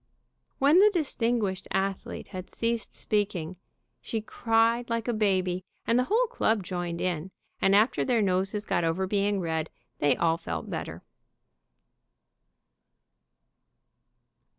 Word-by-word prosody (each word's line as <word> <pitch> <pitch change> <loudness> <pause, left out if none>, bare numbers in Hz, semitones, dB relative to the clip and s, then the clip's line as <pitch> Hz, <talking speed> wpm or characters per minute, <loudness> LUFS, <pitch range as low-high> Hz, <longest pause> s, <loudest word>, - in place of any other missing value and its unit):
When 290 +6 +5
the 420 +2 +7
distinguished 230 - -1
athlete 195 0 -3
had 185 -2 -7
ceased 230 -1 -2
speaking 185 -5 -1 0.4
she 225 - -3
cried 230 +2 +1
like 230 0 -1
a 240 - +1
baby, 185 -4 +1 0.2
and 235 +2 +3
the 250 - +2
whole 455 - +3
club 220 - 0
joined 175 -2 -4
in, 180 -1 -2 0.3
and 195 +1 +4
after 215 +4 +3
their 245 -3 +2
noses 195 +2 0
got - - 0
over 165 +3 0
being 200 +1 +1
red 160 -2 -2 0.3
they 145 - +3
all 165 -1 +2
felt 85 - -5
better. - - -5
200 Hz, 125 wpm, -28 LUFS, 180-230 Hz, 0.4 s, the